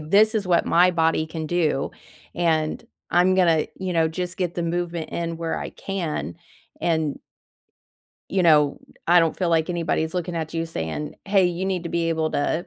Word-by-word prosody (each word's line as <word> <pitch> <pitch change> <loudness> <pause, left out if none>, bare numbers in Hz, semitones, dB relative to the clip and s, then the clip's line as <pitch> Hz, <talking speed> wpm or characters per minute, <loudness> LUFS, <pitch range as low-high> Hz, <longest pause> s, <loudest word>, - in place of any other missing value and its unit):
this 205 +8 +4
is 205 -4 0
what 175 -2 +2
my 180 +2 +5
body 165 -2 +1
can 160 0 -5
do, 155 -5 0 0.4
and 160 -3 0 0.2
I'm 180 +1 +4
gonna," 170 -4 +3
you 185 -1 -3
know, 165 -1 +3
"just 180 +2 -4
get 180 -2 -2
the 175 - -2
movement 170 -1 -2
in 170 -1 -3
where 165 -1 -2
I - - -5
can." 160 - -4 0.4
And 160 -4 0 1.1
you 190 -1 +1
know, 150 -4 +4 0.3
I 175 0 +6
don't 165 -1 +1
feel 180 -3 0
like 165 +1 +2
anybody's 165 -1 -1
looking 175 -1 -2
at 160 0 -4
you 165 0 -1
saying, 150 - -4
"Hey, 195 -2 +3
you 175 +1 -2
need 185 -3 -1
to - - -3
be 170 -1 0
able 160 -1 0
to," 160 +4 -1
170 Hz, 185 wpm, -23 LUFS, 160-180 Hz, 1.1 s, I